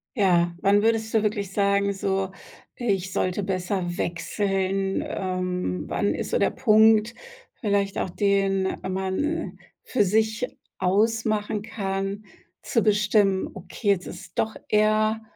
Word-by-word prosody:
Ja, 175 -5 +3
wann 200 +1 +4
würdest 225 0 +1
du 220 - +4
wirklich 205 -2 -1
sagen, 200 0 +2
so: 195 -1 -1 0.4
Ich 195 -6 -1
sollte 185 +2 0
besser 185 -2 -2
wechseln? 195 +3 -1
Ähm, 180 - -2
wann - - 0
ist - - -4
so - - +2
der - - +3
Punkt, 220 +1 +4 0.5
vielleicht 200 -2 0
auch - - -1
den 195 0 +1
man 190 - -2 0.3
für 225 - +1
sich 220 +4 +1 0.3
ausmachen 215 +2 +1
kann, 195 -1 -3 0.4
zu 230 - +1
bestimmen: 205 -2 +2
„Okay, 195 +3 -4
jetzt 195 -3 +2
ist 180 -1 -10
doch 220 0 0
eher 215 +1 +2
200 Hz, 125 wpm, -25 LUFS, 190-215 Hz, 0.5 s, wann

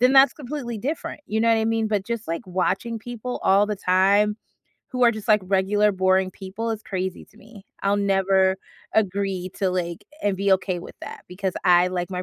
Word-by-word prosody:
then 250 +2 +5
that's 270 +1 +7
completely 270 -4 -5
different, 295 +4 -4
you 220 +1 -1
know 230 - +3
what 225 - +5
I 220 - 0
mean? 225 -1 0
But 205 -3 0
just, 235 -5 -4
like, 170 +6 -3
watching 190 +5 -1
people 245 +2 -6
all 200 +2 +4
the 210 - -2
time, 195 +3 +3 0.5
who 250 -1 +2
are 235 - +7
just, 220 0 -7
like, 210 -2 +5
regular 200 +2 +2
boring 185 0 +2
people 205 +5 -5
is 220 -1 -4
crazy 185 -1 -4
to - - -25
me. 215 -2 -15 0.2
I'll 200 +1 +2
never 190 -1 +2 0.4
agree 195 -3 0
to, 195 -2 +1
like 175 -2 -3 0.2
and 205 -2 +1
be 200 +1 0
okay 185 -1 +1
with - - -11
that - - -9
because 185 +1 -3
I 180 -1 +5
like 180 0 -3
my 180 -1 -3
200 Hz, 205 wpm, -23 LUFS, 190-225 Hz, 0.5 s, that's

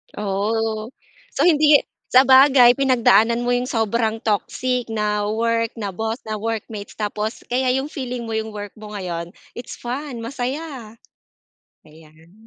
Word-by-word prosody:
Oh, 215 +2 -2 0.5
so - - +2
hindi 305 -3 +5 0.2
sabagay, 260 -1 +7
pinagdaanan 235 -3 +3
mo 245 - 0
yung 245 +1 0
sobrang 225 -1 -1
toxic 245 +4 -1
na 210 -2 -1
work, 230 +1 0
na 205 -4 -4
boss, 220 +4 -3
na 215 -1 -4
workmates, 220 -1 -5
tapos 210 +1 -4
kaya 255 +1 +1
yung 270 +3 -3
feeling 250 -3 -5
mo 225 - -6
yung 220 -1 -3
work 205 -1 -6
mo 210 -1 -9
ngayon, 175 -2 -5 0.2
it's 240 - -8
fun, 250 0 -6
masaya. 255 -1 -5 0.9
Ayan, 160 +1 -19
225 Hz, 135 wpm, -21 LUFS, 210-250 Hz, 0.9 s, sabagay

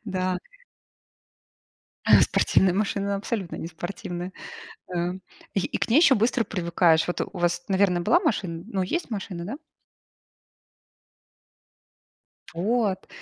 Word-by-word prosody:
Да. 185 -3 -1 1.8
Спортивная 185 -2 +3
машина- 200 -1 0
абсолютно 200 -3 -4
не - - -5
спортивная, 175 +2 -6 0.6
э. 175 +1 0 0.4
И 195 - -1
к - - -1
ней 235 - +4
еще 310 -4 +7
быстро 230 +2 +2
привыкаешь. 170 -4 +2
Вот 175 - -3
у - - -5
вас, 175 0 0
наверное, 190 -2 +2
была 345 - +4
машина? 185 - -1
Ну 200 -4 -2
есть 255 - -2
машина, 190 -5 -5
да? 255 +7 -4 3.0
Вот. 195 +2 0
190 Hz, 110 wpm, -25 LUFS, 175-215 Hz, 3.0 s, еще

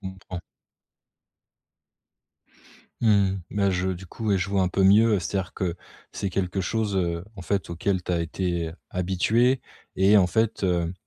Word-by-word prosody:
comprends. 95 -2 -7 2.6
Mmh 115 - +4
mh. 100 -2 +3
Bah 100 -1 +1
je 90 0 0
du 95 0 -6
coup, 110 +5 -7
ouais, 100 - +4
je 90 +2 -2
vois 100 -1 +2
un 90 - +2
peu 95 +1 0
mieux. 105 +3 +6
Heu - - +2
c'est-à-dire 95 +1 -3
que, 90 -3 -2 0.4
c'est 100 - -2
quelque 95 +1 -1
chose, 105 +2 -1
heu, 85 -2 -1
en - - -8
fait, 95 0 -2
auquel 90 +2 -1
tu 90 - -3
as 85 - +1
été 85 0 -2 0.2
habituée 110 +8 +2 0.4
et 95 +3 +5
en 95 - +4
fait, 110 +1 0
heu, 85 -2 +1
95 Hz, 170 wpm, -25 LUFS, 90-100 Hz, 2.6 s, mieux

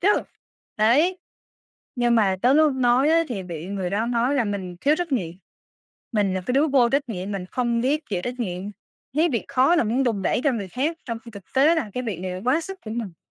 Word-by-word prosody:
chứ, 390 - +3 0.7
đấy. 295 - +3 0.8
Nhưng 240 -1 +2
mà 195 -4 +3
tới 255 +3 +5
lúc 305 -1 +5
nói 255 +2 +3
á, 330 +1 +4
thì 200 -6 -4
bị 170 -2 -7
người 190 -2 -3
đó 215 +4 0
nói 245 +3 +1
là 260 - +2
mình 190 -4 -4
thiếu 290 +2 +3
trách 345 -5 -3
nhiệm, 180 -10 0 0.8
mình 200 -3 +1
là 185 - -1
cái 250 - 0
đứa 280 +4 +3
vô 260 -4 +4
trách 275 -1 0
nhiệm, 195 -1 -4
mình 190 -2 -4
không 235 +1 -1
biết 295 +4 0
chịu 180 -3 -1
trách 245 +3 -5
nhiệm, 180 -4 -3 0.5
thấy 325 +3 +3
việc 235 - -1
khó 270 +6 +3
là 285 - +3
muốn 240 +5 +1
đùn 220 -6 0
đẩy 235 - +1
cho 285 - +3
người 200 -5 -4
khác, 290 - -2
trong 230 -2 -4
khi 230 - -10
thực 200 -3 -11
tế 290 +5 +5
là 235 -10 -2
cái 250 - -2
việc 200 -7 -4
này 185 0 -4
là 185 - -6
quá 260 +6 +3
sức 380 +4 -7
của 215 - -6
mình. 215 -7 -5
240 Hz, 245 wpm, -24 LUFS, 200-275 Hz, 0.8 s, tới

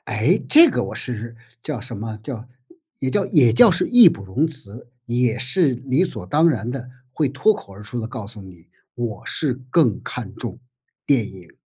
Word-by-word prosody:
诶， - - +1
这 325 +2 +8
个 - - -1
我 - - -7
是 115 -1 -4 0.3
叫 145 -7 -5
什 120 0 -8
么 110 +1 -6
叫， 120 -1 -8 0.5
也 130 - -2
叫 195 +7 +1
也 125 -8 +4
叫 210 - +7
是 175 - +1
义 245 -6 +8
不 100 - -6
容 110 +12 0
辞， 120 -7 -4 0.2
也 120 0 0
是 150 +6 +3
理 130 +7 0
所 180 - -5
当 155 +3 +3
然 120 -6 -2
地 125 -1 -6 0.2
会 145 0 0
脱 210 +11 +2
口 100 - -12
而 100 +2 -12
出 120 +4 -5
地 110 - -5
告 110 -2 -8
诉 105 -1 -10
你， 90 -3 -16 0.3
我 120 -5 -6
是 145 -6 +1 0.2
更 130 - +2
看 - - -7
重 - - -7 0.4
电 130 -7 +1
影。 90 -3 -16
125 Hz, 210 characters per minute, -21 LUFS, 110-150 Hz, 0.5 s, 这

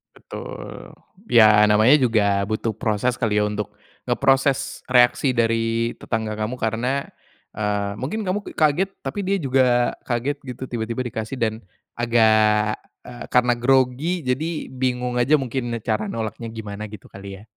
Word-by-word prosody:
Betul, - - -9 0.4
ya 110 -2 +7
namanya 110 +6 +5
juga 105 -7 +2
butuh 110 +1 -2
proses 110 +3 0
kali 105 -3 0
ya 105 - +2
untuk, 105 0 -4 0.3
ngeproses 135 +2 +1
reaksi 125 +2 +4
dari 115 0 0
tetangga 110 -1 -3
kamu 110 +4 -3
karena, 125 +5 -1 0.5
eee, 105 -1 -1
mungkin 210 +10 -3
kamu 195 +3 0
k - - -16
kaget 155 +5 +2 0.2
tapi 205 - -3
dia 195 +1 +1
juga 125 -3 +2
kaget 125 +4 -2
gitu 130 -1 -7
tiba-tiba 115 0 -4
dikasih 110 +3 -5
dan, 110 -2 +1 0.4
agak, 110 -2 +3 0.3
eee, 120 -1 -8
karena 125 -1 +4
grogi 130 +7 +1
jadi 155 +6 -2
bingung 125 -1 -1
aja 130 +5 +3
mungkin 125 -2 -3
cara 110 -2 -2
nolaknya 115 +1 -5
gimana 105 -1 -7
gitu 105 - -11
kali 95 0 -10
ya? - - -15
120 Hz, 145 wpm, -22 LUFS, 110-130 Hz, 0.5 s, ya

